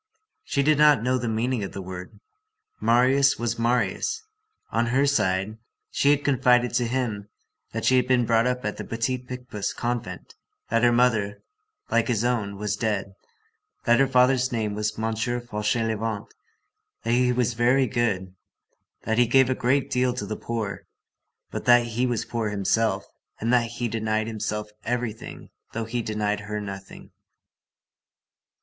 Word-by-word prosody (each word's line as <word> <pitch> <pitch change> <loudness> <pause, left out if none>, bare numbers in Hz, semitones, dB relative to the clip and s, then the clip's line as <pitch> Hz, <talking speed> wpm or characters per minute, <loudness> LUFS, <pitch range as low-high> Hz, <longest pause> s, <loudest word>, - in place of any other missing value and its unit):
She 140 - 0
did 150 +1 +3
not 150 -5 +6
know 130 +1 +1
the 120 - -2
meaning 115 +1 -1
of 95 - -6
the 95 - -5
word. 90 0 -8 0.6
Marius 130 +4 +4
was 120 -1 -2
Marius. 120 - 0 0.5
On 115 +1 +1
her 135 +4 +2
side, 105 -5 0 0.3
she 140 - +2
had 145 0 +3
confided 125 -3 +3
to 120 -1 +1
him 115 -5 -2 0.4
that - - -3
she 130 - +5
had 125 0 +2
been 125 -2 +3
brought 115 +1 +3
up 125 -1 -2
at 105 - -2
the - - -5
Petit 115 +3 -2
Picpus 125 -4 -5
convent, 120 -7 -4 0.4
that 115 0 +2
her 120 0 +5
mother, 115 -4 +1 0.5
like 115 -1 +2
his 115 -3 0
own, 110 -5 -1
was 105 0 -2
dead, 105 -2 -2 0.7
that 120 +1 +4
her 135 - +4
father's 130 0 +3
name 110 -3 -1
was 105 0 -2
M. 110 0 -1
Fauchelevent, 110 -2 -2 0.7
that 115 - -1
he 125 0 +3
was 125 -1 +1
very 125 +3 +3
good, 100 -6 -1 0.7
that 110 +1 0
he 120 - +5
gave 130 +1 +4
a - - +4
great 130 +2 0
deal 125 0 +1
to 105 - -4
the 110 +2 -4
poor, 110 -4 -4 0.6
but - - -5
that 120 -1 +6
he 120 +2 -1
was 120 -3 -1
poor 115 -2 -2
himself, 105 +2 0 0.3
and 115 +3 0
that 120 -1 +3
he 120 +1 -3
denied 110 -1 -1
himself 105 -1 -4
everything 120 -2 -4 0.2
though 115 0 -3
he 120 +2 -2
denied 105 -1 -1
her 105 +1 -4
nothing. 100 -1 -9
115 Hz, 160 wpm, -25 LUFS, 105-125 Hz, 0.7 s, not